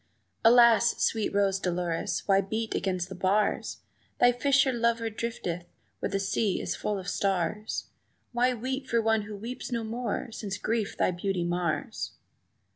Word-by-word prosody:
"Alas, 235 Hz, 0 st, +6 dB
sweet 220 Hz, -2 st, +1 dB
Rose 200 Hz, -1 st, +2 dB
Dolores, 175 Hz, -2 st, -1 dB
why 195 Hz, -1 st, +5 dB
beat 220 Hz, +3 st, -3 dB
against 185 Hz, -2 st, -1 dB
the 190 Hz, -, -8 dB
bars? 190 Hz, +3 st, 0 dB, 0.4 s
Thy 245 Hz, -, +6 dB
fisher 270 Hz, +2 st, +3 dB
lover 230 Hz, -1 st, +1 dB
drifteth 180 Hz, -6 st, -4 dB, 0.3 s
where -, -, -2 dB
the 195 Hz, -, -1 dB
sea 195 Hz, +1 st, 0 dB
is -, -, -2 dB
full 210 Hz, -1 st, -2 dB
of 190 Hz, -1 st, -7 dB
stars; 195 Hz, +2 st, -1 dB, 0.5 s
Why 245 Hz, +1 st, +2 dB
weep 260 Hz, +3 st, -3 dB
for 235 Hz, -, +2 dB
one 225 Hz, -1 st, +2 dB
who 210 Hz, 0 st, -7 dB
weeps 235 Hz, +5 st, -6 dB
no 235 Hz, -1 st, -1 dB
more? 235 Hz, +1 st, -3 dB
since 205 Hz, -3 st, -4 dB
grief 220 Hz, 0 st, -1 dB
thy -, -, +2 dB
beauty 180 Hz, 0 st, -1 dB
mars!" 175 Hz, -2 st, -2 dB
215 Hz, 155 wpm, -28 LUFS, 190-235 Hz, 0.5 s, Alas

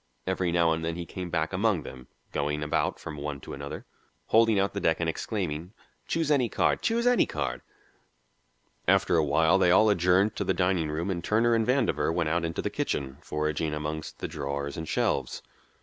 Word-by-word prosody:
Every 95 Hz, -2 st, 0 dB
now 85 Hz, -1 st, +3 dB
and 80 Hz, 0 st, -1 dB
then 80 Hz, 0 st, -2 dB
he 85 Hz, 0 st, -5 dB
came 90 Hz, +2 st, -6 dB
back 80 Hz, +1 st, -1 dB
among 95 Hz, -4 st, +1 dB
them, 65 Hz, -1 st, -10 dB, 0.2 s
going 75 Hz, 0 st, -1 dB
about 75 Hz, -, 0 dB
from 75 Hz, -, -8 dB
one 70 Hz, -1 st, -4 dB
to -, -, -8 dB
another, 70 Hz, +1 st, -7 dB, 0.4 s
holding 115 Hz, -1 st, +5 dB
out 100 Hz, 0 st, +1 dB
the 100 Hz, -, -2 dB
deck 80 Hz, -4 st, +1 dB
and 85 Hz, -, 0 dB
exclaiming, 85 Hz, -1 st, -3 dB, 0.3 s
"Choose 165 Hz, -2 st, 0 dB
any 130 Hz, -5 st, +3 dB
card -, -, +1 dB
choose 235 Hz, +1 st, +1 dB
any 245 Hz, 0 st, +4 dB
card." 65 Hz, -5 st, -3 dB, 1.3 s
After -, -, +4 dB
a 80 Hz, -, +4 dB
while 80 Hz, +5 st, +3 dB
they 90 Hz, -, +4 dB
all 105 Hz, +4 st, +5 dB
adjourned 90 Hz, +3 st, +3 dB
to -, -, 0 dB
the 95 Hz, -, 0 dB
dining 90 Hz, -3 st, +1 dB
room 80 Hz, +5 st, -2 dB
and 85 Hz, -2 st, -3 dB
Turner 115 Hz, +2 st, +2 dB
and 115 Hz, -1 st, +1 dB
Vandover 80 Hz, -, +2 dB
went 80 Hz, -2 st, 0 dB
out 85 Hz, +2 st, 0 dB
into 80 Hz, 0 st, -3 dB
the -, -, -2 dB
kitchen, 65 Hz, -1 st, -2 dB
foraging 75 Hz, +1 st, -2 dB
among 75 Hz, +1 st, -3 dB, 0.2 s
the -, -, -4 dB
drawers 70 Hz, -1 st, -4 dB
and 80 Hz, 0 st, -5 dB
shelves. 65 Hz, -2 st, -1 dB
85 Hz, 195 wpm, -28 LUFS, 75-95 Hz, 1.3 s, holding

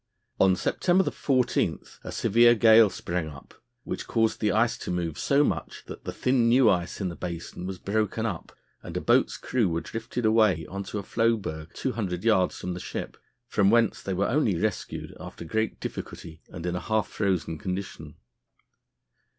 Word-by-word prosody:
On 95 Hz, -1 st, +5 dB
September 180 Hz, -, +2 dB
14 130 Hz, -3 st, +1 dB, 0.3 s
a -, -, -6 dB
severe 120 Hz, +2 st, +4 dB
gale 110 Hz, -1 st, +7 dB
sprang 85 Hz, -3 st, -3 dB
up, 70 Hz, -2 st, -12 dB, 0.3 s
which -, -, -5 dB
caused 115 Hz, -1 st, +1 dB
the 105 Hz, -2 st, +1 dB
ice 115 Hz, +2 st, +2 dB
to -, -, -6 dB
move 85 Hz, -3 st, -2 dB
so 140 Hz, +1 st, +3 dB
much 80 Hz, -, -3 dB
that -, -, -10 dB
the -, -, -3 dB
thin 125 Hz, -2 st, +2 dB
new 120 Hz, -2 st, +6 dB
ice 90 Hz, -2 st, -2 dB
in 95 Hz, -3 st, -1 dB
the 85 Hz, -, -7 dB
basin 85 Hz, +1 st, -6 dB
was 95 Hz, -1 st, -5 dB
broken 110 Hz, +3 st, -1 dB
up 95 Hz, -7 st, -4 dB, 0.3 s
and -, -, -6 dB
a -, -, +1 dB
boat's -, -, +2 dB
crew 115 Hz, -7 st, 0 dB
were 85 Hz, 0 st, -1 dB
drifted 115 Hz, +4 st, -4 dB
away 110 Hz, -7 st, +3 dB
on 100 Hz, +4 st, -5 dB
to -, -, -5 dB
a 100 Hz, -, -3 dB
floe 115 Hz, +3 st, +2 dB
berg 80 Hz, -5 st, -6 dB
200 100 Hz, -9 st, -3 dB
yards 110 Hz, -5 st, +2 dB
from 90 Hz, -, -4 dB
the 90 Hz, -, -6 dB
ship, -, -, -6 dB, 0.3 s
from 100 Hz, -4 st, +2 dB
whence 115 Hz, -1 st, +3 dB
they 95 Hz, -, -3 dB
were 100 Hz, +2 st, +1 dB
only 115 Hz, -, +1 dB
rescued 105 Hz, +1 st, -3 dB
after -, -, -9 dB
great 110 Hz, +6 st, -1 dB
difficulty 80 Hz, -1 st, -7 dB
and 85 Hz, -1 st, -8 dB
in 90 Hz, 0 st, -1 dB
a -, -, -1 dB
half 110 Hz, +1 st, 0 dB
frozen 90 Hz, -6 st, -1 dB
condition. 90 Hz, -5 st, -5 dB
100 Hz, 185 wpm, -27 LUFS, 90-115 Hz, 0.3 s, gale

